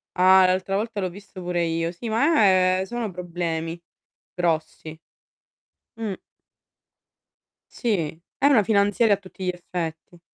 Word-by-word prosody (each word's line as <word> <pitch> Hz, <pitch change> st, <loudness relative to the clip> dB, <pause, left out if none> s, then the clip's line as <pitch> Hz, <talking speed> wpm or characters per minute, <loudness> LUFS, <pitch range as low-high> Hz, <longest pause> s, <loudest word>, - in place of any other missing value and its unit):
Ah, 185 Hz, +1 st, +6 dB
l'altra 185 Hz, +1 st, 0 dB
volta 215 Hz, +1 st, -2 dB
l'ho 185 Hz, -1 st, -1 dB
visto 200 Hz, 0 st, -11 dB
pure 175 Hz, -1 st, -1 dB
io. 165 Hz, 0 st, -1 dB
Sì, 180 Hz, +7 st, -8 dB
ma, 230 Hz, +2 st, +3 dB, 0.3 s
ehm, -, -, 0 dB
sono 235 Hz, 0 st, -4 dB
problemi 170 Hz, -2 st, -4 dB, 0.5 s
grossi. 160 Hz, -2 st, -2 dB, 1.0 s
Mh. 225 Hz, -3 st, -3 dB, 1.6 s
Sì, 170 Hz, -, -2 dB, 0.2 s
è -, -, 0 dB
una 265 Hz, -7 st, +5 dB
finanziaria 205 Hz, +1 st, +3 dB
a -, -, -12 dB
tutti 190 Hz, -1 st, -9 dB
gli -, -, +1 dB
effetti. 175 Hz, -1 st, -6 dB
185 Hz, 130 wpm, -24 LUFS, 170-205 Hz, 1.6 s, Ah